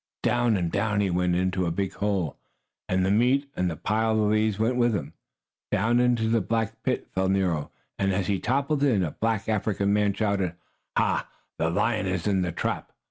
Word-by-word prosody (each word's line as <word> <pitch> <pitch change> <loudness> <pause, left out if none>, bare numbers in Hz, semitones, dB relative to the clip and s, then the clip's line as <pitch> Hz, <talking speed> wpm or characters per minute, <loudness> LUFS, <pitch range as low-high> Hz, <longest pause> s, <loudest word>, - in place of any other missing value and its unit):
Down 120 -3 +2
and 85 -3 -1
down 105 0 0
he 100 -2 +1
went, 90 0 +1
into 90 0 0
a - - +1
big 95 +3 -2
hole, 100 -6 -1 0.5
and 95 0 +2
the 95 - +2
meat 130 +6 +2
and 90 0 0
the 80 - -4
pile 110 +5 0
of 105 -1 +2
leaves 110 -1 +2
went 115 +3 +1
with 120 -2 +2
him. 95 - -4 0.6
Down 115 +5 +2
into 120 -2 +2
a 115 - +3
black 115 +2 -2
pit 130 +1 -1
fell 95 0 +1
Nero, 90 -6 0 0.3
and, 95 0 +2
as 95 0 0
he 100 0 0
toppled 140 +6 0
in, 120 -10 +3
a 80 - -2
black 110 -2 -1
African 100 -2 0
man 105 -1 +2
shouted: 100 -5 -1 0.4
"Ha! - - +1 0.3
The 80 - +1
lion 105 +3 0
is 90 -2 -2
in 100 -3 +2
the 90 -1 -1
trap! - - -3
100 Hz, 200 wpm, -26 LUFS, 95-115 Hz, 0.6 s, a